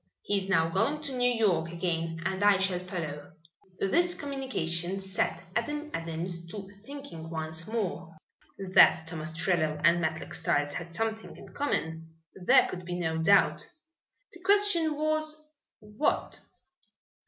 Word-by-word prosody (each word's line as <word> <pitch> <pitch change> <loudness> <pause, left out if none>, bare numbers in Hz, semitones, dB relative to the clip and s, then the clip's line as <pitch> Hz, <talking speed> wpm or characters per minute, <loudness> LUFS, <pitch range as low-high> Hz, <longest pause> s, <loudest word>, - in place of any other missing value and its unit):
He 205 - +1
is 195 0 -3
now 165 -4 +4
going 195 - +1
to 280 -3 -4
New 245 0 +3
York 190 -9 +2
again 165 -1 -2
and 190 +1 -1
I 205 -1 +6
shall 190 -1 +1
follow." 160 -6 -6 0.5
This 350 - +3
communication 195 - -2
set 190 -1 -1
Adam 295 +6 -2
Adams 170 +1 -3
to 195 +2 -7 0.2
thinking 275 - -8
once 160 0 -4
more. 180 -7 -3 0.6
That 160 - +7
Tom 165 -1 -4
Ostrello 160 -1 0
and 170 +1 +5
Matlock 160 -1 -2
Styles 145 0 0
had 170 -1 -6
something 220 +5 -3
in - - -12
common 160 - -3 0.2
there 180 -2 +5
could 180 0 -6
be 175 0 -4
no 160 -2 -1
doubt. 195 +4 +4 0.7
The 345 - -13
question 370 -5 +3
was, 310 0 0 0.4
What? 210 +6 -1
185 Hz, 140 wpm, -29 LUFS, 165-245 Hz, 0.7 s, That